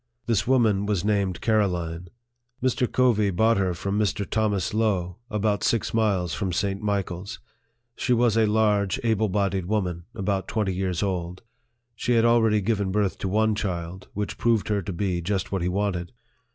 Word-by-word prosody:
This 110 -3 +1
woman 110 -6 +3
was 100 -3 0
named 100 -4 0
Caroline. 90 -6 0 0.5
Mr. 130 -1 0
Covey 115 -5 +3
bought 110 +4 +3
her 95 -3 0
from 100 +4 -2
Mr. 100 -1 0
Thomas 105 -4 0
Lowe, 100 -5 0
about 105 -1 0
six 115 0 0
miles 100 -7 +1
from 95 +1 -2
St. 100 +2 -1
Michael's. 100 -1 -3 0.6
She 125 - -2
was 120 -2 +3
a 110 -1 +4
large, 105 -3 +2
able 110 -2 +1
bodied 95 -2 0
woman, 90 -5 -1
about 100 -2 -1
twenty 105 -4 -1
years 90 -1 -1
old. 90 -1 -3 0.5
She 120 +2 -1
had 115 -1 +4
already 115 -2 +4
given 100 -2 0
birth 100 -1 0
to - - -2
one 110 +3 +2
child, 90 -3 -4
which 105 0 -3
proved 115 -3 +1
her 105 -1 +1
to 95 - -5
be 90 -1 -1
just 100 +2 -2
what 95 -2 -1
he 90 - 0
wanted. 90 -2 -2
100 Hz, 170 wpm, -25 LUFS, 95-110 Hz, 0.6 s, a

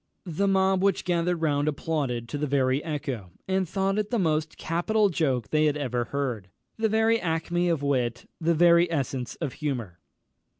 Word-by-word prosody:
_" 160 - -6
The 200 +4 +2
mob 190 -1 +3
which 195 -1 +1
gathered 175 -1 0
round 145 -1 +1
applauded 145 -6 -2
to 145 - -4
the 150 - -1
very 135 0 +1
echo, 135 - -4 0.2
and 190 -2 0
thought 195 +1 0
it 210 -1 -2
the 240 - 0
most 160 -4 0
capital 205 +6 +1
joke 135 - 0
they 155 0 +3
had 150 -1 +1
ever 125 -4 -1
heard, 125 -9 -3 0.3
the 220 0 0
very 220 +1 +3
acmé 175 +1 0
of 155 -4 -1
wit, 125 -4 -1
the 165 +1 +2
very 170 +1 +5
essence 135 -5 -2
of 150 -6 -4
humour. 120 -12 -3
155 Hz, 180 wpm, -26 LUFS, 135-180 Hz, 0.3 s, very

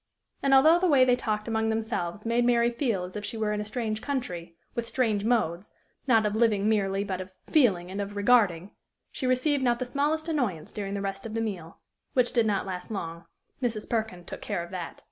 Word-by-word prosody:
And, 275 - +1
although 315 +6 +7
the 370 - +2
way 275 -5 +6
they 250 -1 +4
talked 215 -3 -2
among 220 -1 0
themselves 220 -4 -2
made 235 +1 +2
Mary 240 0 +3
feel 235 -7 -1
as 180 +2 -8
if 210 - -4
she 205 +2 -4
were 215 -1 0
in 210 - -1
a - - -5
strange 215 0 -3
country, 180 -13 -4 0.2
with 235 -1 -3
strange 220 -5 +1
modes, 210 -6 0 0.3
not 225 -4 +4
of 210 - 0
living 215 -3 +2
merely, 200 -2 +1
but 185 -2 -3
of 185 - -8 0.2
feeling 190 - +3
and 200 +2 -3
of 200 0 -5
regarding, 205 -4 +3 0.4
she 260 - -3
received 265 +3 +2
not 240 -2 +3
the 255 - -3
smallest 295 +5 0
annoyance 240 - -1
during 200 -1 -4
the 200 - -2
rest 195 +2 -4
of 220 - -7
the - - 0
meal 185 -7 -4 0.4
which 250 -2 +2
did 235 -3 +3
not 200 -2 0
last 185 -2 -5
long: 170 -5 -5 0.4
Mrs. 225 -4 -2
Perkin 220 -6 -2
took - - -8
care 170 - -2
of 170 - -11
that. 180 -3 -6
220 Hz, 220 wpm, -27 LUFS, 195-245 Hz, 0.4 s, although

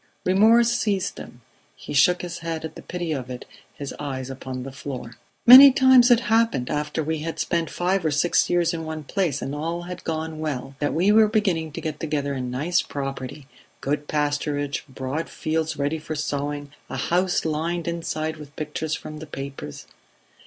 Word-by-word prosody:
Remorse 225 +5 +5
seized 200 -5 -1
him; 120 - -11 0.3
he - - -8
shook 175 +6 +4
his 170 -1 -5
head 165 -1 -4
at 160 - -7
the - - -10
pity 175 -2 -4
of 130 -4 -3
it, 125 -1 -7 0.3
his 140 -2 -6
eyes 135 -2 -4
upon 130 -1 -6
the 135 - -7
floor. 130 -3 -7 0.3
"Many 265 +3 +12
times 260 -1 +6
it 240 -1 +6
happened, 225 - +1
after 150 +1 -2
we 160 +1 -2
had 165 +2 -4
spent 170 -2 -1
five 180 +1 0
or 160 - +2
six 150 +4 +2
years 175 -1 +2
in 165 -1 -4
one 160 -1 -5
place 175 -1 -1
and 135 - -4
all 165 +4 -3
had 180 +1 -8
gone 160 -1 -3
well, 140 -4 -4
that 145 -1 -1
we 185 +5 +3
were 215 0 +6
beginning 190 -8 0
to - - -5
get 155 -2 -4
together 145 -3 -2
a 130 - -3
nice 130 +8 0
property 135 0 -6 0.3
good 145 +1 -2
pasturage, 145 -1 -1
broad 135 +5 -4
fields 160 0 -2
ready 145 +3 -1
for 155 0 -5
sowing, 145 -1 -3 0.2
a - - -4
house 180 0 +1
lined 165 +2 -2
inside 160 -2 -3
with 150 -1 -12
pictures 155 0 -3
from 155 0 -8
the 160 - -9
papers 135 - -7
155 Hz, 185 wpm, -24 LUFS, 145-175 Hz, 0.3 s, Many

